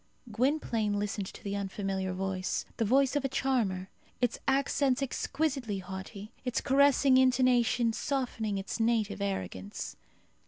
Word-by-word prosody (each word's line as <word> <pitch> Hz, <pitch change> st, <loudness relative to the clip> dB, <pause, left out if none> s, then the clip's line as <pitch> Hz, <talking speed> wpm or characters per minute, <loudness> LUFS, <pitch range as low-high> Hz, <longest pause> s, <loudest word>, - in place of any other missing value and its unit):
Gwynplaine 230 Hz, -4 st, +1 dB
listened 205 Hz, -1 st, -2 dB
to -, -, -11 dB
the 200 Hz, 0 st, -3 dB
unfamiliar 195 Hz, -1 st, -2 dB
voice 185 Hz, 0 st, -2 dB
the 225 Hz, -, +1 dB
voice 265 Hz, +5 st, +3 dB
of 290 Hz, -, +1 dB
a 270 Hz, -, 0 dB
charmer, 230 Hz, -9 st, 0 dB, 0.3 s
its 245 Hz, -2 st, 0 dB
accents 275 Hz, 0 st, +2 dB
exquisitely 270 Hz, -5 st, -1 dB
haughty, 190 Hz, +2 st, -7 dB
its 250 Hz, -2 st, 0 dB
caressing 275 Hz, -1 st, +4 dB
intonation 250 Hz, -2 st, +3 dB
softening 230 Hz, -6 st, -2 dB
its 195 Hz, +4 st, -4 dB
native 225 Hz, -3 st, +1 dB
arrogance. 95 Hz, -, -4 dB
225 Hz, 125 wpm, -30 LUFS, 195-265 Hz, 0.3 s, caressing